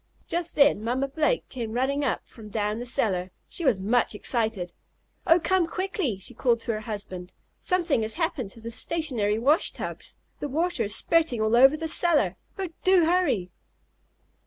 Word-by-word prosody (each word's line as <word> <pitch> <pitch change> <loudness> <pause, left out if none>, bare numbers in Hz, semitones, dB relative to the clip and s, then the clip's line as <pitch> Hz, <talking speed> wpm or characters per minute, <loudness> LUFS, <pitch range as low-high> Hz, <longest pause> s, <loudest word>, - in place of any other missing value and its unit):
Just 345 0 -1
then 280 -7 +4
Mamma 255 +4 -1
Blake 310 - 0
came 230 -4 -5
running 270 +4 0
up 265 - 0
from 220 -3 -13
down 210 +1 -2
the 245 - -5
cellar. 185 -6 0 0.2
She 345 - -6
was 255 -10 +2
much 225 +3 +1
excited. 215 -6 -1 0.5
"Oh, 335 0 +6
come 370 0 +1
quickly!" 370 - -2
she 190 - -5
called 235 -2 +1
to 230 - -2
her 215 - -3
husband. 200 -5 -6 0.3
"Something 345 -9 +1
has 220 0 -2
happened 325 - -2
to 230 - -12
the 230 +1 -7
stationary 235 -8 0
wash 280 +8 +3
tubs. - - -7 0.2
The 290 - -4
water 315 -4 0
is 205 - +1
spurting 320 -8 +2
all 220 +1 +2
over 270 +5 +6
the 320 +1 -3
cellar. 305 - +3 0.2
Oh, 380 -2 -3
do 370 -3 +5
hurry!" 290 - +1
250 Hz, 175 wpm, -26 LUFS, 215-325 Hz, 0.5 s, Oh